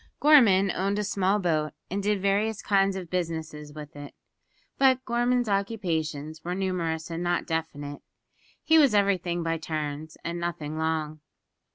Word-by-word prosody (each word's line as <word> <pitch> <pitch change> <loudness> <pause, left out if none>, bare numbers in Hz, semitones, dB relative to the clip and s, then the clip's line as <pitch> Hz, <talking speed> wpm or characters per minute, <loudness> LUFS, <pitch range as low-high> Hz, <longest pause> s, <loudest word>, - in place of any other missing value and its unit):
Gorman 215 -11 +6
owned 195 +3 -1
a 210 - 0
small 195 0 +1
boat, 155 -6 0 0.2
and 200 +2 -1
did 205 0 +1
various 205 +2 +1
kinds 195 -1 +2
of 180 -3 -7
business 165 -3 -2 0.2
with 150 -1 -9
it. 145 -1 -9 0.6
But 260 -1 +4
Gorman's 240 0 +1
occupations 160 -7 -2
were 180 +1 -3
numerous 170 -4 -2
and 165 +1 -3
not 175 0 0
definite. 145 -3 -4 0.6
He 320 0 +5
was 275 -8 +5
everything 185 -4 +1
by 165 0 -1
turns, 155 0 -4
and 170 +1 -3
nothing 160 -3 -4
long. 155 -1 -2
175 Hz, 150 wpm, -27 LUFS, 160-200 Hz, 0.6 s, Gorman